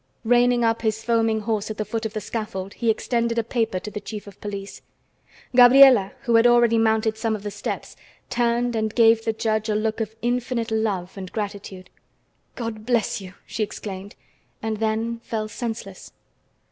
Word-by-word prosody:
Reining 245 +1 +3
up 225 0 +1
his 220 0 -1
foaming 225 -1 +1
horse 215 -1 -2
at 215 - -5
the 215 - -2
foot 225 0 -2
of 215 - -14
the 215 - -3
scaffold, 200 -3 -5
he 235 - -1
extended 235 +1 0
a 230 - +2
paper 225 -4 -1
to 210 - -8
the 210 - -5
chief 210 0 -7
of 200 -2 -14
police. 200 -1 -6 0.7
Gabriela, 250 -4 +8
who 235 -4 +3
had 230 +1 +6
already 240 -1 +4
mounted 220 0 +1
some 220 0 0
of 205 - -8
the 205 - -4
steps, 205 - -5 0.3
turned 240 0 0
and 220 -1 -1
gave 225 -1 +5
the 225 - +1
judge 220 0 -1
a 210 - +1
look 220 +1 -1
of 220 0 -4
infinite 245 -1 -1
love 205 -5 -1
and 185 -1 -7
gratitude. 200 -3 -6 0.6
"God 230 -3 -5
bless 235 -3 0
you!" 190 0 -11
she - - -5
exclaimed, 200 -1 -5 0.4
and 220 -1 -3
then 225 +2 -1
fell 220 -2 -4
senseless. 220 -3 -6
220 Hz, 180 wpm, -23 LUFS, 210-235 Hz, 0.7 s, Gabriela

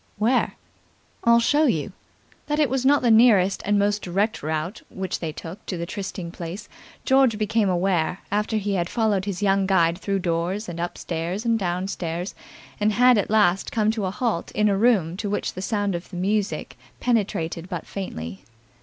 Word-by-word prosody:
"Where?" 230 +5 +1 0.7
"I'll 235 0 +6
show 295 +6 +3
you." 155 - 0 0.6
That 295 0 0
it 290 -5 +2
was 265 -1 0
not 285 -1 +4
the 240 - +4
nearest 215 -5 +5
and 205 0 +2
most 205 +1 +1
direct 200 +5 -1
route 155 +6 -3
which 190 0 -4
they 165 -2 -3
took 165 +4 -9
to 180 - -3
the 170 - -3
trysting 185 -2 -5
place 175 +4 -7 0.4
George 265 -4 +4
became 215 -1 +1
aware 180 -1 0
after 210 +2 0
he 205 -1 -1
had 175 -2 -1
followed 210 -4 +1
his 200 0 -3
young 195 -1 +2
guide 170 -2 +3
through 200 0 -1
doors 180 +4 -1
and 170 -1 -6
up 175 +1 -3
stairs 175 +6 -3
and 230 -1 +2
down 180 0 -1
stairs 175 0 -4 0.5
and 210 0 +2
had 250 +1 +5
at - - -2
last 205 -4 +3
come 215 -1 +2
to 220 -3 -2
a - - 0
halt 210 -3 -2
in 210 0 +2
a 200 - +2
room 195 -6 +2
to 205 0 -3
which 205 - -2
the 185 - -6
sound 205 -1 -1
of 175 0 -5
the 185 - -9
music 200 +3 -1 0.2
penetrated 180 -7 -1
but - - -4
faintly. 95 - -6
195 Hz, 190 wpm, -24 LUFS, 175-220 Hz, 0.7 s, I'll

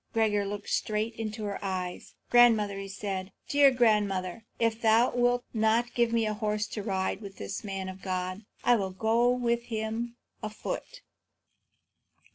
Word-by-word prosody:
Gregor 210 -3 +2
looked 205 0 -5
straight 215 +2 0
into 220 -1 -5
her 200 -1 -3
eyes. 185 -2 -4 0.2
"Grandmother," 210 -5 +4
said 195 -1 -4 0.2
he, 285 - -2
"dear 280 -1 +9
grandmother, 210 -5 +1
if 230 0 0
thou 225 +2 +4
wilt 245 0 +2
not 225 +2 +2
give 235 -1 +2
me 230 -1 +2
a 215 - 0
horse 210 0 -1
to 210 - -5
ride 190 0 -1
with 195 -2 -9
this 200 - -5
man 195 -2 -4
of 190 0 -8
God, 185 +2 -3 0.2
I 245 -1 +5
will 195 -3 -1
go 225 +5 +2
with 235 -1 +1
him 225 +1 -3 0.3
afoot." 215 - -5
215 Hz, 155 wpm, -29 LUFS, 195-235 Hz, 0.3 s, dear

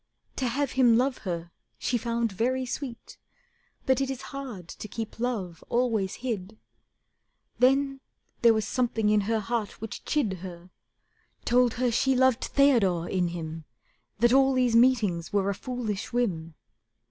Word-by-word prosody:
To 260 - 0
have 275 +3 -1
him 245 -3 +5
love 255 +1 +1
her 170 -1 -4 0.3
she 245 - -1
found 235 -1 -1
very 255 +6 0
sweet, 250 -1 -7 0.7
But 265 0 +2
it 270 - 0
is 265 -2 -5
hard 250 -11 -7
to 210 - -8
keep 225 +1 -6
love 205 -9 -3
always 230 -6 0
hid. 215 -3 -4 1.0
Then 270 +2 +3 0.4
there 230 -1 +6
was 220 -1 -1
something 230 -4 0
in 210 0 +4
her 225 -1 +2
heart 220 0 -3
which 225 0 -7
chid 215 - 0
Her, 180 0 -10 0.7
told 245 -1 +3
her 245 0 +1
she 265 +3 +2
loved 260 -2 +3
Theodore 215 -12 +3
in 180 -2 0
him, 165 -2 -6 0.5
That 240 +3 +4
all 270 0 +5
these 250 -2 +2
meetings 225 -9 +3
were 200 -1 +1
a - - -1
foolish 225 -3 -4
whim. 170 -10 -1
230 Hz, 150 wpm, -27 LUFS, 195-255 Hz, 1.0 s, there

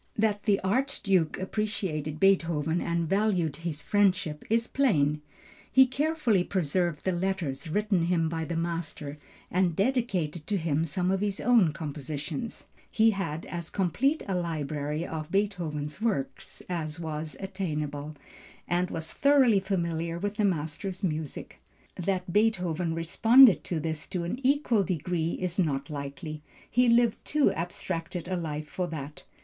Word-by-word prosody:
That 210 -1 +1
the 205 -3 +3
Archduke 195 - +1
appreciated 185 -7 -2
Beethoven 170 -4 +2
and 170 -1 -1
valued 190 -6 +1
his 165 -2 -4
friendship 190 -7 +1
is 230 +1 +3
plain. 150 - +2 0.5
He 265 0 +7
carefully 260 - +1
preserved 175 -3 -1
the 190 - +2
letters 175 -5 -2
written 200 -1 +1
him 170 -2 +2
by 160 0 -2
the 170 - -3
master 165 -3 -3 0.3
and 180 -2 +2
dedicated 195 - 0
to 205 - +1
him 160 -2 0
some 180 +4 0
of 195 0 0
his 205 -1 -1
own 225 -9 +4
compositions. 150 - -5 0.2
He 225 0 +4
had 165 -6 -3
as 170 -2 -5
complete 240 - +1
a 195 - -1
library 155 -2 -2
of 155 -2 -5
Beethoven's 170 -6 -2
works 200 -13 -3
as 165 -2 -3
was 155 -1 -4
attainable, 155 -6 -4 0.5
and 180 +1 +1
was 160 -1 -4
thoroughly 270 -7 +5
familiar 170 -3 -2
with 205 +3 -2
the 210 - +2
master's 180 +3 -2
music. 155 -4 -4 0.3
That 180 -1 -2
Beethoven 180 -6 +1
responded 225 +8 +6
to 170 - -2
this 160 0 -3
to 180 -3 -3
an 175 +9 -3
equal 255 -6 +3
degree 170 -2 -1
is 180 0 -2
not 145 -4 0
likely. 150 +2 -6 0.3
He 245 0 +4
lived 235 -1 +3
too 300 -2 +3
abstracted 170 0 -4
a 185 - -1
life 155 -3 -4
for 180 +2 -3
that. 150 -3 -7
175 Hz, 145 wpm, -28 LUFS, 155-200 Hz, 0.5 s, He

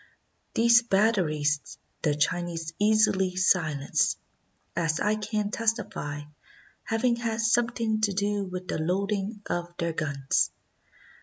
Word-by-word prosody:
These 235 +1 +6
batteries 180 -10 +1 0.2
the 150 -3 +1
Chinese 165 +1 -1
easily 205 -3 +3
silenced, 160 -6 +2 0.6
as 165 -1 0
I 210 - +2
can 210 -1 -2
testify, 215 -11 -2 0.6
having 235 +2 0
had 230 -2 -2
something 230 -1 +1
to 210 -2 +2
do 205 +1 0
with 185 0 -6
the - - -2
loading 200 +5 -1
of 175 0 -2
their 170 -1 -1
guns. 140 -4 0
195 Hz, 110 wpm, -27 LUFS, 165-220 Hz, 0.6 s, These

